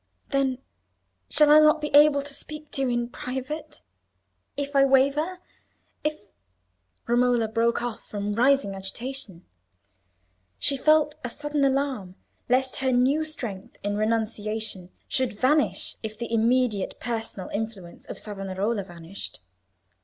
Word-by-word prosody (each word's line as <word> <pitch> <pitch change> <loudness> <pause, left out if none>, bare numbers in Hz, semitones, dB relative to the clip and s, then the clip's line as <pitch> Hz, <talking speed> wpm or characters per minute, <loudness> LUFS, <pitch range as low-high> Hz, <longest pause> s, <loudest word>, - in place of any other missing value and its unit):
"Then 270 -2 +1 0.7
shall 300 -1 +5
I 305 - +9
not 305 0 +5
be 300 0 -3
able 290 -1 +6
to 285 0 -5
speak 300 +1 -8
to 270 - -1
you 265 - +1
in 240 -1 0
private? 265 - -6 0.8
if 285 0 -3
I 275 - +6
waver, 280 +6 +3 0.7
if—" 305 0 -1 0.9
Romola 240 -1 +3
broke 230 +2 +1
off 240 -2 -4
from 205 0 -3
rising 255 -2 +3
agitation. 195 -1 -5 1.1
She 275 - +3
felt 305 +2 +4
a 250 - -2
sudden 295 +3 -1
alarm 265 -9 0 0.3
lest 260 +1 +2
her 265 -1 +1
new 260 +5 +3
strength 235 -11 -6
in 205 0 -1
renunciation 215 -3 -2 0.2
should 255 -6 -1
vanish 295 +4 +2
if 215 -1 -6
the 235 0 -5
immediate 230 -3 +1
personal 225 -5 -4
influence 205 -5 -6
of - - -7
Savonarola 200 +1 -2
vanished. 175 +1 -8
245 Hz, 130 wpm, -26 LUFS, 215-280 Hz, 1.1 s, I